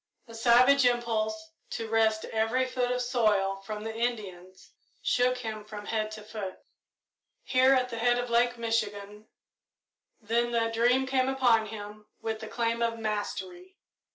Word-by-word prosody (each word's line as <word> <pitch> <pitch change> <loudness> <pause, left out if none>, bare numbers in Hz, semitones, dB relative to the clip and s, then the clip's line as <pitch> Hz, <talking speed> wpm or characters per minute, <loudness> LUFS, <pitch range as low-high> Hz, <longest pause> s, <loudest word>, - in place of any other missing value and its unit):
A 230 - -12
savage 245 +4 +5
impulse 240 +5 0 0.2
to 225 - -4
wrest 220 -1 +2
every 225 +4 0
foot 250 -1 -1
of 250 0 0
soil 210 -6 +1
from 210 +2 -7
the 225 0 -4
Indians 195 -6 -4 0.3
shook 250 +1 +1
him 220 -3 -5
from 210 -1 -9
head 215 -1 -1
to 215 -1 -9
foot. 210 -3 -6 0.9
Here, 260 +1 +4
at 250 -1 +1
the 230 -1 -5
head 240 +1 +3
of 245 -1 -3
Lake 240 +1 +2
Michigan 210 -2 -3 0.9
then 235 +2 0
the 230 -1 +1
dream 245 +3 +3
came 260 0 +1
upon 245 -5 +3
him 210 0 -9
with 220 -1 -3
the 220 - -7
claim 230 0 -1
of 230 -1 0
mastery. 350 - -5
230 Hz, 155 wpm, -28 LUFS, 215-245 Hz, 0.9 s, savage